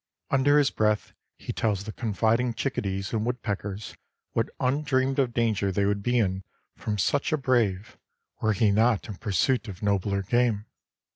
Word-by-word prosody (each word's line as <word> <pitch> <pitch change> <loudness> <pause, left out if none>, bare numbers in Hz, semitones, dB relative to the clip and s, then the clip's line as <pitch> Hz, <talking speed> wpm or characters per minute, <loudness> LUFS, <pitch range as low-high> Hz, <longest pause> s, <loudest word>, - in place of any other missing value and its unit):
Under 140 +2 +4
his 145 -1 +4
breath 105 0 0 0.2
he - - -6
tells 105 -3 0
the 110 - -6
confiding 115 +2 0
chickadees 100 -6 -2
and 110 -1 0
woodpeckers 105 -4 -4 0.4
what - - 0
undreamed 135 0 +1
of 130 -3 +2
danger 110 -4 +1
they 100 +1 +1
would 100 0 0
be 120 +4 +1
in 95 -4 0 0.3
from 105 -1 -3
such 140 +8 +1
a 155 - +2
brave, 120 -8 0 0.4
were 110 0 +2
he 105 +1 +3
not 110 +1 +2
in 105 - -7
pursuit 115 +4 +1
of 100 0 -8
nobler 100 -1 +1
game. 115 0 +1
110 Hz, 160 wpm, -27 LUFS, 100-125 Hz, 0.4 s, Under